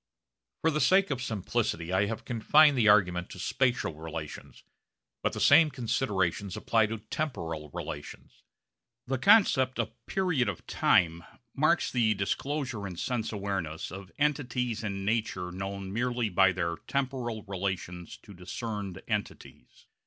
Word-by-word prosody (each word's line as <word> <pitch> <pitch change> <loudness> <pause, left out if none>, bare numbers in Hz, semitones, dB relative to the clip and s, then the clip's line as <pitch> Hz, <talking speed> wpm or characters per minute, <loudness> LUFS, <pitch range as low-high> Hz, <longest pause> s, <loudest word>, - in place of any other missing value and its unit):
For 160 - +3
the 155 0 0
sake 190 -2 +4
of 130 -3 -2
simplicity 95 -6 -2
I 100 +2 +3
have 115 +1 -5
confined 145 +6 +5
the 115 -4 +3
argument 90 -4 +3
to - - -10
spatial 125 - 0
relations; 75 -4 -8 0.6
but - - 0
the - - -4
same 160 -2 +6
considerations 105 - -1
apply 110 -2 +2
to 110 +1 -4
temporal 85 - -4
relations. 75 -1 -8 0.6
The 130 0 -2
concept 145 - +5
of 115 -2 -1 0.2
'period 160 - +1
of 95 - -6
time' 85 -2 +2 0.3
marks 155 +5 +2
the 110 -4 +2
disclosure 125 +2 -2
in 90 - -7
sense 120 +5 -2
awareness 95 -6 -3
of 95 +1 -9
entities 125 -6 0
in 100 -2 -3
nature 100 -5 -1
known 95 +1 -5
merely 120 0 0
by 95 +1 +4
their 85 -2 -2
temporal 130 -5 -2
relations 90 -2 -4
to 100 - -12
discerned 95 +1 -6
entities. 105 -2 -5
105 Hz, 140 wpm, -29 LUFS, 95-130 Hz, 0.6 s, same